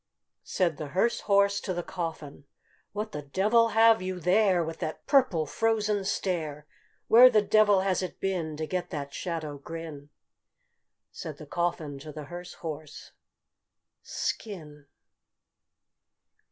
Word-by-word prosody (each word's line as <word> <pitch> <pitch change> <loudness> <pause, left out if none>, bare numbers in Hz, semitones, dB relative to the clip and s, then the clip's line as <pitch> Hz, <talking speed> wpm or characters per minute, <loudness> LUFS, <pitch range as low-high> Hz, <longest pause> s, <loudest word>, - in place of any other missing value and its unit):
Said 170 -5 0
the 155 - -5
hearse 190 +11 +1
horse 200 0 +4
to 185 - -3
the 175 - -3
coffin, 160 -6 -6 0.5
"What 210 +1 -4
the 150 - -5
devil 210 +11 +3
have 225 -2 +6
you 185 0 -4
there, 185 0 +3
With 165 0 -6
that 155 - -5
purple 255 - +3
frozen 210 +2 0
stare? 155 -7 -2 0.4
Where 245 +3 +9
the 215 -4 +3
devil 205 -2 +4
has 190 -1 0
it 185 - -6
been 170 -5 -2
To 155 - -2
get 180 +2 -3
that 140 -2 -5
shadow 155 -5 -4
grin?" 155 -2 -8 1.0
Said - - -7
the - - -10
coffin 160 -5 -2
to 155 +2 -9
the 150 0 -7
hearse 175 +4 -9
horse, 155 -1 -7 0.9
"Skin!" 150 -9 -5
175 Hz, 135 wpm, -28 LUFS, 155-200 Hz, 1.0 s, Where